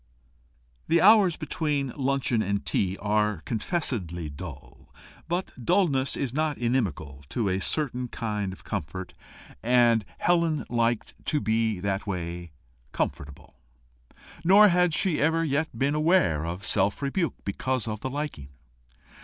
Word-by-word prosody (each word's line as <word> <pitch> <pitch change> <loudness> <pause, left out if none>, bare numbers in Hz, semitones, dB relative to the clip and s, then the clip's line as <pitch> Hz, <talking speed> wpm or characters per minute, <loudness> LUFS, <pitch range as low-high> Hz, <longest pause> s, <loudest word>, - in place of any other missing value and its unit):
The 170 - +4
hours 195 -2 +6
between 145 -4 -2
luncheon 135 -4 0
and 100 -1 -1
tea 95 -1 0
are 105 -4 0
confessedly 105 - -3
dull, 70 -4 -10 0.4
but 175 +3 -2
dulness 155 - +2
is 130 -3 -2
not 155 0 0
inimical 90 - -2
to 110 -5 -1
a 95 +1 0
certain 125 -1 -1
kind 105 -5 -3
of 95 - -12
comfort, 90 +6 -5 0.5
and 120 -2 +4
Helen 170 -3 +1
liked 120 -1 0
to 150 - +2
be 110 -4 0
that 100 +1 -2
way 85 -3 -4 0.4
comfortable. 70 0 -4 0.8
Nor 200 +4 +7
had 180 -2 +3
she 180 -6 +2
ever 160 +2 +2
yet 155 +1 -1
been 140 +2 +1
aware 150 - +2
of 90 +3 -5
self 100 +9 0
rebuke 165 +5 -1
because 130 +4 -2
of 110 -1 -3
the 130 - -4
liking. 140 - -5
120 Hz, 130 wpm, -26 LUFS, 95-155 Hz, 0.8 s, Nor